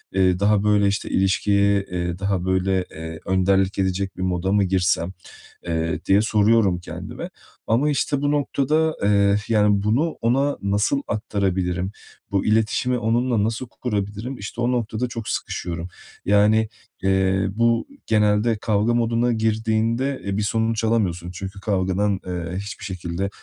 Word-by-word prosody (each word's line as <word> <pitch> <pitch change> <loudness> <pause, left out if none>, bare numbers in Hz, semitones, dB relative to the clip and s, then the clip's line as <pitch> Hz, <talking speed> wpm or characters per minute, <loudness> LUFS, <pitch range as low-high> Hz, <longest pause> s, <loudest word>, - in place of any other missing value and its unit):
Eee, 90 -1 +3
daha, 100 0 +3
böyle, 105 -1 +3
işte, 100 0 -1
ilişkiye, 100 +1 +2
eee, 90 -1 -3
daha 100 -2 -1
böyle, 95 0 +1
eee, 80 0 -7
önderlik 95 +1 +2
edecek 95 0 -1
bir 90 - -5
moda 90 0 0
mı 100 0 +3
girsem? 90 -1 +1 0.6
Eee, 80 0 -1
diye 100 +2 +4
soruyorum 105 -3 +3
kendime. 90 - -7 0.4
Ama, 125 +7 +2
işte, 145 -1 0
bu 145 - +1
noktada, 150 +2 +1
eee, 100 0 +4
yani, 105 -2 +3
bunu, 130 +11 +1
ona 135 +5 +1
nasıl 105 +7 +1
aktarabilirim, 95 -3 -1 0.4
bu 100 -1 0
iletişimi 110 +3 +1
onunla 120 -1 +1
nasıl 115 +4 -2
kurabilirim? 105 +2 -3
İşte 110 +4 -6
o 120 +1 +2
noktada 120 0 -1
çok 115 -2 -6
sıkışıyorum. 85 0 -3 0.4
Yani, 105 +2 +4 0.3
eee, 95 0 +2
bu 115 +2 +1 0.2
genelde 105 +1 +2
kavga 110 +1 +1
moduna 120 +1 +1
girdiğinde 110 +4 0
e, 100 0 -2
bir 105 - 0
sonuç 110 +1 0
alamıyorsun. 90 -6 0
Çünkü 95 +2 -7
kavgadan, 95 +1 0
eee, 90 0 -4
hiçbir 100 +1 -6
şekilde, 95 0 -3
100 Hz, 140 wpm, -22 LUFS, 95-115 Hz, 0.6 s, diye